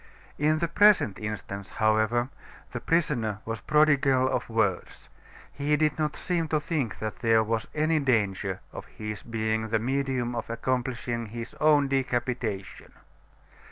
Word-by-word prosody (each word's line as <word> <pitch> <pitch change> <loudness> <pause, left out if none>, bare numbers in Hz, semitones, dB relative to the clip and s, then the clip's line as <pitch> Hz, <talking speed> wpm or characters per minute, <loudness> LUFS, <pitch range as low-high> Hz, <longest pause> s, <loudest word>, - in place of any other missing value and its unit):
In 155 +2 +3
the 170 +1 0
present 165 - +4
instance, 100 -2 -5
however, 110 +3 +1 0.4
the - - -4
prisoner 135 -11 0
was 115 0 -4
prodigal 140 -4 +3
of 125 -2 -2
words. 110 -5 -1 0.4
He 145 +1 +1
did 155 0 +1
not 150 -1 0
seem 170 -3 -1
to 155 0 +1
think 150 -7 -2
that 110 -1 -5
there 115 -2 +4
was 110 0 -2
any 155 +1 +2
danger 100 -8 0
of - - -8
his 105 -1 -6
being 110 -1 -1
the 110 - +2
medium 130 0 -1
of 115 -1 -4
accomplishing 120 -1 -2
his 115 +2 -7
own 150 -2 +4
decapitation. 120 -6 -2
120 Hz, 140 wpm, -27 LUFS, 110-150 Hz, 0.4 s, present